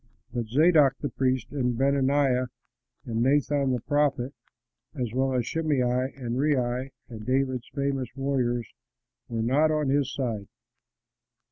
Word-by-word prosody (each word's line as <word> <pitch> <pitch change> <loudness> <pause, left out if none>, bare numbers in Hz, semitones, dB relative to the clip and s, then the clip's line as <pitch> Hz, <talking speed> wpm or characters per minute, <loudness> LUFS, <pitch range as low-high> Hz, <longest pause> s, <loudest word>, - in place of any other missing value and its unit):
But 120 -2 -2
Zadok 150 +2 +5
the 145 - -3
priest 130 -1 0
and 125 -4 -1
Benaiah 135 -1 +2 0.6
and 115 -2 -2
Nathan 140 +1 +2
the 125 -2 -1
prophet, 145 -2 0 0.6
as 120 -5 -3
well 130 +1 +1
as 125 -2 +1
Shimei 155 -2 0 0.3
and 125 -2 -3
Rei 130 -2 0 0.2
and 110 -3 -9
David's 130 0 0
famous 140 -3 -1
warriors, 130 -3 0 0.6
were 115 -1 -2
not 140 +7 +3
on 150 -3 +1
his 140 0 +1
side. 115 -7 -3
130 Hz, 130 wpm, -27 LUFS, 120-140 Hz, 0.6 s, Zadok